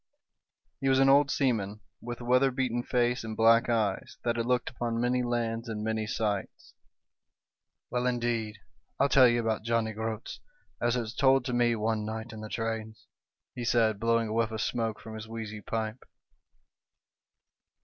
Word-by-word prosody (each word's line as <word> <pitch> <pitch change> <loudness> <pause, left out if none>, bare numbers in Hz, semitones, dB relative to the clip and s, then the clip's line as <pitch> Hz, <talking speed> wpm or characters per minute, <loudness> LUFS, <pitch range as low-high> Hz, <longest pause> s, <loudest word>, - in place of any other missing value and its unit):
HE 135 - +1
was 130 - +4
an 135 0 +5
old 140 +1 +5
seaman, 105 -8 0 0.2
with 120 0 -6
weather 125 +2 +3
beaten 125 -2 -1
face 120 0 0
and 110 -1 -6
black 115 +1 +5
eyes, 110 -4 -1
that 120 -1 0
had 115 0 -1
looked 125 -1 +1
upon 120 -2 -2
many 125 +1 +1
lands 115 -1 -2
and 105 -1 -4
many 110 0 -1
sights. 105 -3 -3 1.2
"Well, 125 0 0
indeed, 120 -3 -1 0.4
I'll 140 +1 +3
tell 130 -3 +7
you 120 0 +2
about 110 -2 -1
Johnny 115 -1 0
Groats 110 0 -5 0.4
as 120 +1 +2
it 125 - 0
was 110 0 -6
told 135 -2 +3
to 125 - -2
me 120 -1 +3
one 110 0 -1
night 110 +2 -5
in 110 - -8
the 110 - -7
trades," 110 -1 -4 0.5
he 125 - -5
said, 115 -3 +2
blowing 115 0 +2
a - - -3
whiff 115 -1 +1
of 110 -1 -4
smoke 115 -2 -1
from 110 - -9
his 110 0 -7
wheezy 110 -1 -6
pipe. 110 +2 -4
115 Hz, 170 wpm, -29 LUFS, 110-120 Hz, 1.2 s, tell